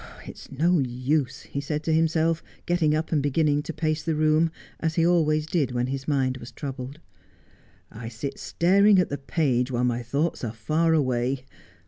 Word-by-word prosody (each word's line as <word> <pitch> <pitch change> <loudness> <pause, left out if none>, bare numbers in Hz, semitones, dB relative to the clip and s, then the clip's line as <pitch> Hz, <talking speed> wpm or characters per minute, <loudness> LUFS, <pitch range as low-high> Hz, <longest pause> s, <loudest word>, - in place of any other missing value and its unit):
It - - -9
is - - -14
no 165 +5 +2
use,' 130 +1 -1
he 140 - -5
said 150 +2 -3
to 160 - 0
himself, 160 +1 +2 0.2
getting 165 -3 +2
up 155 +1 -2
and 155 -3 +2
beginning 145 +1 +1
to 155 - -6
pace 155 -1 -1
the 160 +1 -1
room, 155 +2 +3 0.3
as 160 0 -1
he 165 - +3
always 155 -3 +2
did 150 -6 0
when 120 0 0
his 135 +1 -4
mind 130 -3 +1
was 120 -1 -10
troubled. 135 -1 -6
• - - -21 1.0
I 115 0 -6
sit 125 +5 -6
staring 200 +4 +4
at 180 - +2
the 145 - -4
page 135 -4 0
while 125 -1 -1
my 120 -1 0
thoughts 140 +8 -2
are 110 -2 -3
far 155 +9 +1
away. 130 -2 0
150 Hz, 190 wpm, -25 LUFS, 130-160 Hz, 1.0 s, staring